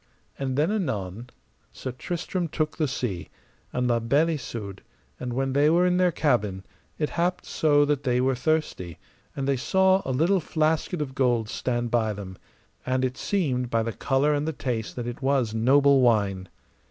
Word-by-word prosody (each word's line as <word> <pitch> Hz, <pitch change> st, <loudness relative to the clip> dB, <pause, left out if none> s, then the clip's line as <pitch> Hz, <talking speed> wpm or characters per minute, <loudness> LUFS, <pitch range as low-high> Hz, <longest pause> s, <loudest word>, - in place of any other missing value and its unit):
And 135 Hz, -1 st, -2 dB
then 155 Hz, +7 st, +2 dB
anon 120 Hz, -, -3 dB, 0.4 s
Sir 130 Hz, -, -6 dB
Tristram 175 Hz, +7 st, -3 dB
took 155 Hz, 0 st, -2 dB
the 155 Hz, -3 st, +1 dB
sea, 125 Hz, -10 st, -3 dB, 0.4 s
and 125 Hz, 0 st, 0 dB
La 120 Hz, -1 st, +2 dB
Beale 140 Hz, +8 st, +2 dB
Isoud; 110 Hz, -, -5 dB, 0.4 s
and 125 Hz, -1 st, -4 dB
when 135 Hz, +1 st, -1 dB
they 145 Hz, +2 st, +4 dB
were 175 Hz, +3 st, +4 dB
in 180 Hz, 0 st, +2 dB
their 180 Hz, -1 st, +3 dB
cabin, 105 Hz, -, 0 dB, 0.3 s
it 150 Hz, -, -1 dB
happed 180 Hz, +1 st, -1 dB
so 145 Hz, -2 st, +3 dB
that 145 Hz, -1 st, 0 dB
they 125 Hz, -3 st, +1 dB
were 130 Hz, +1 st, +2 dB
thirsty, 125 Hz, -, -1 dB, 0.4 s
and 135 Hz, -1 st, -3 dB
they 140 Hz, -1 st, +2 dB
saw 190 Hz, +8 st, +3 dB
a 130 Hz, -, -3 dB
little 170 Hz, +9 st, +2 dB
flasket 160 Hz, +2 st, 0 dB
of 130 Hz, -2 st, -8 dB
gold 120 Hz, -5 st, +1 dB
stand 120 Hz, -2 st, -2 dB
by 110 Hz, -3 st, +1 dB
them, 95 Hz, -2 st, -8 dB, 0.4 s
and 130 Hz, 0 st, 0 dB
it 130 Hz, 0 st, -2 dB
seemed 130 Hz, -12 st, -1 dB
by 115 Hz, -1 st, +1 dB
the 115 Hz, 0 st, -3 dB
colour 140 Hz, +6 st, +1 dB
and 145 Hz, +1 st, -1 dB
the 160 Hz, -, -1 dB
taste 120 Hz, -6 st, -3 dB
that 120 Hz, -, -4 dB
it 120 Hz, +2 st, -6 dB
was 135 Hz, -5 st, +1 dB
noble 135 Hz, +4 st, +4 dB
wine. 100 Hz, -6 st, +2 dB
130 Hz, 180 wpm, -26 LUFS, 120-155 Hz, 0.4 s, they